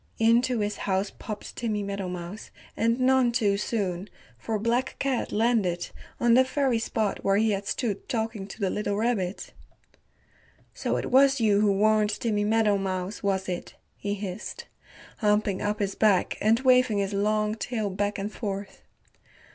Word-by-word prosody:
Into 235 +1 +3
his 205 0 -2
house 190 +1 0
popped 210 -2 -8
Timmy 215 -3 -2
Meadowmouse, 190 -1 -5 0.3
and 230 +2 +1
none 255 -1 +4
too 215 -5 +2
soon, 200 -3 -2 0.3
for 220 -1 -3
Black 235 +4 0
Cat 270 -3 -1
landed 210 -6 +1 0.3
on 240 -1 +4
the 255 +2 +7
very 260 -2 0
spot 220 -2 -2
where 195 0 +3
he 220 +1 +3
had 200 0 -2
stood 215 -7 -2
talking 225 -5 -2
to 210 - -10
the 195 -3 0
little 205 -1 -1
rabbit. 210 -5 -1 1.2
"So - - -1
it - - -4
was 270 +1 +5
you 210 -3 +3
who 210 -1 +4
warned 215 +1 +3
Timmy 210 -3 0
Meadowmouse, 200 -3 0
was 195 -1 0
it?" 180 -1 -5 0.2
he 205 0 -3
hissed, 200 0 -6 0.5
humping 210 -3 +1
up 210 +1 -1
his 200 -1 -1
back 205 -4 +2
and 220 +2 +4
waving 250 -4 +4
his 200 0 -1
long 210 +1 +1
tail 220 -2 -3
back 205 +2 -1
and 200 +1 -4
forth. 200 -3 -5
210 Hz, 155 wpm, -26 LUFS, 200-230 Hz, 1.2 s, the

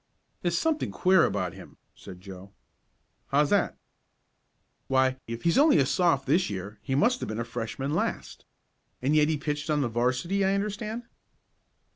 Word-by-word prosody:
"There's 170 -1 0
something 315 - 0
queer 185 -3 +4
about 95 -3 -2
him," - - -13 0.2
said 90 -1 -12
Joe. 95 0 -11 0.7
"How's 145 +1 +2
that?" 205 -2 +2 1.1
"Why, 130 -1 +2
if 115 0 -6
he's 170 +9 +3
only 295 0 +6
a - - +4
Soph. 170 -7 +2
this 165 +7 +2
year 100 +1 -6
he 135 +4 -2
must 240 - +3
have - - -5
been 110 - -4
a 120 - -2
Freshman 120 +4 -4
last. - - -3 0.6
And 145 +4 +2
yet 150 0 +4
he 155 - +1
pitched 150 +1 -3
on 150 -1 +2
the 125 - 0
'varsity 125 - 0
I 195 +1 +2
understand." 210 +3 -3
145 Hz, 165 wpm, -27 LUFS, 120-185 Hz, 1.1 s, only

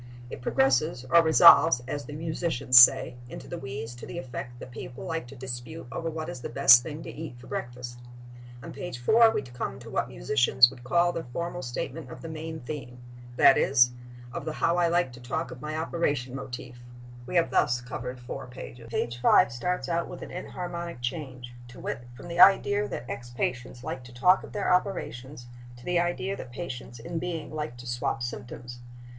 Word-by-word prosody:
It - - -7
progresses 135 +1 +1
or 170 - +8
resolves, 160 -4 +7
as 145 +1 -4
the 145 - -8
musicians 155 -5 +3
say, 125 0 +6
into - - -9
the 175 - -6
wheeze 130 -4 -6
to 120 - -10
the 125 - -7
effect 120 -1 -6
that 125 - -10
people 120 +1 -8
like 165 -6 -3
to 140 - -11
dispute 130 +5 -7
over 165 - -3
what 160 0 -5
is 125 - -7
the - - -5
best 120 -1 +7
thing 155 +3 -7
to - - -7
eat 155 -5 -8
for 120 - -14
breakfast. 120 0 -6 0.6
On - - -8
page 135 -2 -6
4 225 - +5
we 220 - -1
come 125 -1 -5
to - - -11
what - - 0
musicians 120 - +4
would 125 -2 -13
call 175 +6 +3
the 165 -1 -5
formal 170 +7 -4
statement 130 +5 -5
of - - -10
the 165 - -6
main 160 0 -6
theme—that 120 -2 +1
is, 125 -2 +4 0.4
of - - -4
the 155 - -4
how 170 +2 +1
I 175 -1 +3
like 170 -6 +1
to 125 - -11
talk 120 - -3
of 125 - -10
my 155 +1 -4
operation 145 -6 -1
motif. 125 -2 -7 0.5
We - - -5
have 170 -1 +3
thus 125 0 +2
covered 125 +1 -6
four 125 +1 -7
pages. 125 -1 -10
Page 120 +1 -3
5 115 - +5
starts 180 +10 -2
out 170 -1 -1
with - - -8
an - - -9
enharmonic 175 -3 -6
change: 125 -2 -5
to 120 - -13
wit, 120 0 -5
from 135 - -11
the 170 0 -5
idea 205 +2 +6
that 120 - -6
ex 120 0 -6
patients 125 0 -3
like 130 - -5
to 120 - -12
talk 180 +10 +4
of - - -10
their 205 -3 +1
operations 145 -9 -2 0.3
to 120 - -15
the 180 -1 +2
idea 175 +3 -1
that 120 - -9
patients 120 -5 -7
in 165 +9 -5
being 165 -3 -5
like 150 -5 -4
to 120 - -11
swap 120 -1 -2
symptoms. 120 0 -7
130 Hz, 200 wpm, -27 LUFS, 120-165 Hz, 0.6 s, or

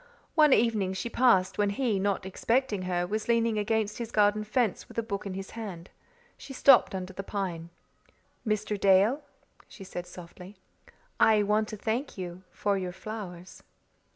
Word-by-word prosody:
One 305 -2 +5
evening 215 -6 +2
she 215 +5 -4
passed 195 -7 +3
when 205 -1 +3
he, 210 -1 0
not 195 -1 -1
expecting 225 +2 0
her, 175 -1 0
was 215 +4 -3
leaning 230 -2 +2
against 215 0 -1
his 235 -2 -4
garden 210 -1 +2
fence 215 -1 -1
with - - -15
a 230 - +1
book 200 -2 -4
in 190 - -5
his 195 0 -7
hand. 195 -7 -8 0.5
She 275 - -9
stopped 260 -6 +5
under 185 0 -5
the 195 - -5
pine. 185 -5 -4 0.7
"Mr. 215 -2 -1
Dale," 200 +9 +4 0.5
she 195 - -12
said 180 -2 -7
softly, 180 +2 -11 0.6
"I 215 -2 +5
want 210 +1 +1
to 215 - -7
thank 230 +6 -3
you 180 -1 -6
for 200 +1 -1
your 180 -1 -4
flowers." 190 -4 -8
205 Hz, 165 wpm, -28 LUFS, 190-225 Hz, 0.7 s, One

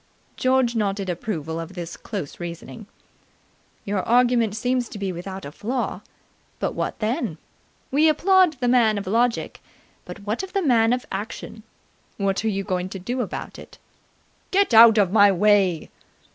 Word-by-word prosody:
George 255 -2 +1
nodded 200 -3 -1
approval 165 -4 -4
of 165 +3 -7
this 170 -2 -6
close 195 -10 -7
reasoning. 175 +5 -8 1.0
"Your 200 -1 -1
argument 240 -2 +2
seems 245 +1 -1
to - - -8
be 195 -2 -3
without 190 +2 -7
a 140 - -7
flaw. 245 - -3 0.6
But - - -2
what - - -3
then? 215 -5 -2 0.5
We 305 +4 +4
applaud 365 +2 +4
the 250 -3 -3
Man 235 -4 +3
of 200 - -4
Logic, 230 +5 0 0.4
but 205 - -10
what 210 +3 -3
of 380 -1 -8
the 390 - 0
Man 230 -5 +3
of 250 0 -1
Action? 215 +2 -6 0.6
What 195 0 -1
are 220 - +1
you 195 -1 -2
going 185 -2 -2
to 195 - -6
do 245 +8 -3
about - - -6
it?" - - -13 0.7
"Get 395 -8 +2
out 225 0 +8
of 195 -4 +3
my 205 -1 +6
way!" 195 -3 +2
215 Hz, 160 wpm, -23 LUFS, 190-245 Hz, 1.0 s, out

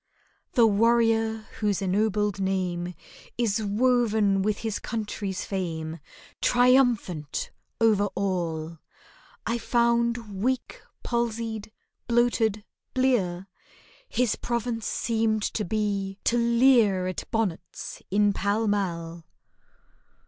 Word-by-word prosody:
The 235 -3 +6
warrior 225 0 +2
whose 205 -3 +1
ennobled 205 +1 0
name 180 -2 -1 0.4
Is 225 -3 +1
woven 215 -2 +2
with 210 +1 0
his 220 -2 -1
country's 205 -4 -4
fame, 165 -4 -4 0.4
Triumphant 245 - +2 0.3
over 215 -3 +4
all, 170 -4 -2 0.7
I 235 +1 -1
found 235 -4 +1
weak, 255 +3 -1 0.2
palsied, 230 -2 -2 0.4
bloated, 235 -3 +2 0.3
blear; 195 -9 +1 0.6
His 245 -3 +1
province 235 -1 -2
seemed 220 -2 0
to 215 - -1
be, 200 -1 -2
to 235 - +2
leer 235 -5 +4
At 185 -1 -4
bonnets 215 -7 -3
in 205 +1 +3
Pall 205 +3 0
Mall. 170 -5 -2
215 Hz, 95 wpm, -26 LUFS, 195-235 Hz, 0.7 s, The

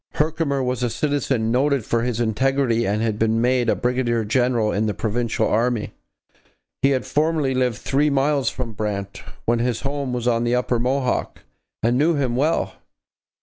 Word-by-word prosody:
Herkimer 150 -3 0
was 125 0 -2
a 120 - +1
citizen 135 -4 0
noted 135 -1 +1
for 115 - 0
his 120 -1 -2
integrity 120 0 +1
and 105 +3 0
had 110 -2 -1
been 110 0 +2
made 125 0 +2
a - - +3
brigadier 120 -2 0
general 120 -1 +1
in 110 +2 0
the 105 - -2
provincial 115 +1 -1
army. 115 0 0 0.9
He 135 - +4
had 130 -2 0
formerly 150 -3 +1
lived 125 -3 0
three 145 +2 +1
miles 140 -2 +1
from 120 -3 -5
Brant, 100 -2 -4 0.2
when 120 0 +2
his 120 -1 -1
home 140 -1 -3
was 120 -1 -2
on 115 -1 +2
the 120 +1 +1
upper 125 -1 0
Mohawk, 130 +1 -1 0.4
and 120 +3 +2
knew 160 +3 +3
him 130 -4 0
well. 150 +6 0
125 Hz, 175 wpm, -22 LUFS, 115-135 Hz, 0.9 s, He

